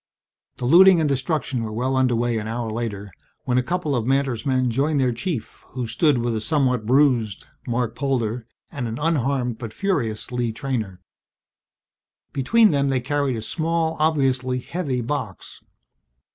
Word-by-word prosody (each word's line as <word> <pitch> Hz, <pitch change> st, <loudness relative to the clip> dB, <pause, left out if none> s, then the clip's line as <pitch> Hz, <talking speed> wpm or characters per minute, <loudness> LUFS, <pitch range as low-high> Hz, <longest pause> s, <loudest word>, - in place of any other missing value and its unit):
The 125 Hz, -, -4 dB
looting 180 Hz, +6 st, +7 dB
and 155 Hz, -, +2 dB
destruction 135 Hz, -2 st, -1 dB
were 110 Hz, -, -4 dB
well 125 Hz, +4 st, -1 dB
under 130 Hz, -2 st, +2 dB
way 120 Hz, -1 st, 0 dB
an 105 Hz, -, -5 dB
hour 115 Hz, 0 st, -3 dB
later 105 Hz, -3 st, -4 dB, 0.3 s
when 125 Hz, 0 st, +2 dB
a -, -, +2 dB
couple 155 Hz, +1 st, -1 dB
of 120 Hz, -1 st, -1 dB
Mantor's 135 Hz, -3 st, 0 dB
men 130 Hz, -2 st, +1 dB
joined 140 Hz, +5 st, +1 dB
their 130 Hz, -2 st, +2 dB
chief, 120 Hz, -, -5 dB
who 125 Hz, -1 st, -3 dB
stood 130 Hz, +5 st, +2 dB
with 120 Hz, -1 st, -1 dB
a 110 Hz, -, -2 dB
somewhat 125 Hz, -6 st, 0 dB
bruised 125 Hz, -6 st, +2 dB, 0.2 s
Marc 120 Hz, -1 st, -1 dB
Polder 120 Hz, -4 st, -1 dB, 0.2 s
and 135 Hz, -7 st, -4 dB
an 115 Hz, +1 st, -4 dB
unharmed 135 Hz, -6 st, 0 dB
but 115 Hz, -3 st, -7 dB
furious 135 Hz, -, -2 dB
Lee 120 Hz, -2 st, -1 dB
Treynor. 110 Hz, -6 st, -4 dB, 1.3 s
Between 215 Hz, -, +4 dB
them 140 Hz, -2 st, +1 dB
they 135 Hz, -1 st, +1 dB
carried 140 Hz, 0 st, -1 dB
a 110 Hz, -, -5 dB
small, 165 Hz, +3 st, -1 dB
obviously 135 Hz, -5 st, +1 dB
heavy 135 Hz, -1 st, -3 dB
box. 120 Hz, -6 st, -5 dB
130 Hz, 160 wpm, -23 LUFS, 115-145 Hz, 1.3 s, looting